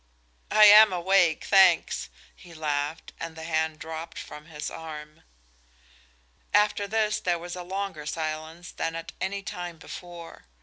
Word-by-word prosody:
"I 215 0 +7
am 210 +1 +9
awake, 180 -2 +2
thanks," 185 - +4 0.3
he 170 -1 -15
laughed, 150 0 -3
and 165 -1 -6
the 160 - -8
hand 160 -1 -1
dropped 160 +1 -7
from 150 +1 -9
his 150 -2 -6
arm. 155 -2 -9 1.3
After 205 -1 +2
this 215 0 0
there 175 -4 0
was 175 +1 -7
a 180 - -6
longer 185 -4 -5
silence 160 +2 -5
than 165 - -3
at 165 0 -6
any 200 +1 -3
time 175 -4 -6
before. 170 - -10
170 Hz, 140 wpm, -26 LUFS, 160-190 Hz, 1.3 s, am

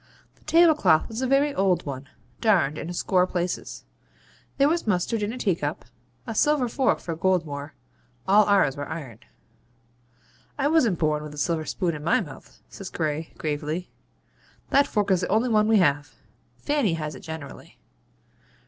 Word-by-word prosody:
The - - -29
tablecloth 320 - +4
was 225 +2 -5
a 260 - 0
very 280 +2 +2
old 185 - +1
one, 135 -1 -6 0.3
darned 175 - +2
in - - -6
a - - -4
score 180 +1 +2
places. 180 -1 -4 0.7
There 280 0 +4
was 330 -4 0
mustard 210 +3 0
in 205 +1 -1
a 250 - -6
teacup, 165 -9 -2 0.4
a 225 - -4
silver 290 +2 +2
fork 255 +2 +1
for 165 - -5
Goldmore 155 -5 -1 0.5
all 205 +2 +6
ours 195 -10 +3
were 145 -1 -6
iron. 140 -9 -7 1.4
'I 285 0 +1
wasn't 250 - +3
born 155 -2 0
with 150 -1 -8
a - - -13
silver 160 +2 -1
spoon 175 0 -1
in 150 -1 -7
my 170 - +3
mouth,' 145 -9 -10
says 195 -2 -9
Gray, 155 0 -3
gravely. 155 +3 -3 0.8
'That 280 +1 +4
fork 205 -2 0
is 185 -1 +3
the 180 - -1
only 220 +5 +1
one 215 -1 +3
we 220 -1 +4
have. 145 -5 +1 0.4
Fanny 285 - 0
has 155 -2 -4
it - - -10
generally.' 160 -3 -9
180 Hz, 165 wpm, -25 LUFS, 155-225 Hz, 1.4 s, all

